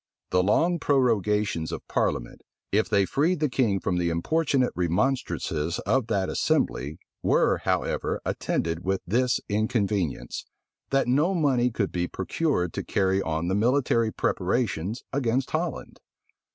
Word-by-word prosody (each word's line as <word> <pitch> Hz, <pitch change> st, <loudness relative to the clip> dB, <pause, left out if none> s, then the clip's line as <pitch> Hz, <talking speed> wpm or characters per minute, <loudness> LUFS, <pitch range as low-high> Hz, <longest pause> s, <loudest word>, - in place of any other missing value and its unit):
The 90 Hz, -, +4 dB
long 165 Hz, -, +2 dB
prorogations 105 Hz, -, +1 dB
of -, -, -6 dB
parliament, -, -, -1 dB, 0.3 s
if 105 Hz, +2 st, +2 dB
they 100 Hz, -1 st, +3 dB
freed 160 Hz, -, +1 dB
the 150 Hz, -4 st, 0 dB
king 110 Hz, -8 st, +1 dB
from 90 Hz, -1 st, -1 dB
the 85 Hz, -1 st, +1 dB
importunate 135 Hz, -, +1 dB
remonstrances 90 Hz, -, 0 dB
of 130 Hz, -3 st, +1 dB
that 100 Hz, -5 st, 0 dB
assembly, 70 Hz, +5 st, 0 dB, 0.2 s
were, -, -, +3 dB
however, -, -, -1 dB
attended 85 Hz, +1 st, -2 dB
with 95 Hz, 0 st, 0 dB
this 125 Hz, +5 st, +1 dB
inconvenience, 105 Hz, -, -1 dB, 0.4 s
that 135 Hz, -1 st, +2 dB
no 150 Hz, +10 st, +2 dB
money 135 Hz, -7 st, +2 dB
could 110 Hz, -4 st, -2 dB
be 90 Hz, 0 st, -1 dB
procured 95 Hz, -, -1 dB
to -, -, -3 dB
carry 95 Hz, 0 st, +1 dB
on 80 Hz, -1 st, -2 dB
the 95 Hz, -, 0 dB
military 115 Hz, +1 st, +2 dB
preparations 100 Hz, +1 st, -1 dB
against 130 Hz, -1 st, 0 dB
Holland. 160 Hz, -2 st, -3 dB
110 Hz, 135 wpm, -26 LUFS, 90-130 Hz, 0.4 s, The